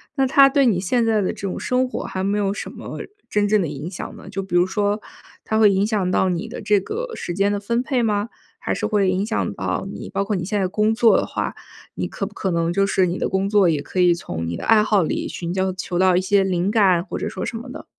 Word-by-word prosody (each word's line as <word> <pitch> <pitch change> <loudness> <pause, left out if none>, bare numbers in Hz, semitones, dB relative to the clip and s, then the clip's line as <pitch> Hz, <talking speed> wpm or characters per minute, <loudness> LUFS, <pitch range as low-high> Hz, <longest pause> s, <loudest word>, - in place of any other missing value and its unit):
那 270 -2 +2
它 275 +1 +6
对 275 0 +3
你 210 -7 +3
现 230 +6 +1
在 220 -2 +2
的 190 - 0
这 - - -12
种 185 - -4
生 255 +1 +1
活， 255 - -5
还 185 - -4
没 200 +2 0
有 200 -1 0
什 - - -6
么 - - -8 0.3
真 210 0 +1
正 210 0 +3
的 170 - -1
影 150 +4 -6
响 180 - -7
呢？ - - -12
就 195 0 -3
比 190 -2 -4
如 175 0 +5
说， 205 +2 -1 0.4
它 220 - 0
会 215 -2 +7
影 195 +1 +2
响 210 -4 0
到 190 - +2
你 180 +5 -2
的 230 - -7
这 210 -1 +3
个 465 - -5
时 175 - -5
间 200 +3 +1
的 205 - -1
分 235 +4 -1
配 260 -2 0
吗？ 210 -1 0 0.3
还 - - -2
是 - - -2
会 205 -3 +2
影 185 +2 0
响 220 - -1
到 - - -3
你， - - -8
包 200 - -1
括 210 0 -1
你 180 - -2
现 205 +2 -1
在 190 - +1
工 210 +4 +1
作 230 -1 +5
的 - - 0
话， - - -3 0.4
你 - - -2
可 - - -4
不 - - -9
可 190 - -2
能 170 0 0
就 195 +2 +2
是 190 -1 +2
你 175 +1 -2
的 - - -1
工 190 +1 0
作 200 -4 +4
也 155 -3 0
可 185 - -5
以 180 -1 +5
从 85 - -5
你 85 - -3
的 - - -7
爱 220 -1 +5
好 210 -3 +3
里， - - -2
寻 170 0 -4
求 190 0 0
求 180 -1 -3
到 185 -1 +4
一 - - +2
些 195 +1 +3
灵 185 0 0
感 190 -6 +4
或 - - -5
者 - - -3
说 - - -5
什 - - -5
么 240 +3 -8
的？ 270 - -9
200 Hz, 305 characters per minute, -21 LUFS, 185-220 Hz, 0.4 s, 会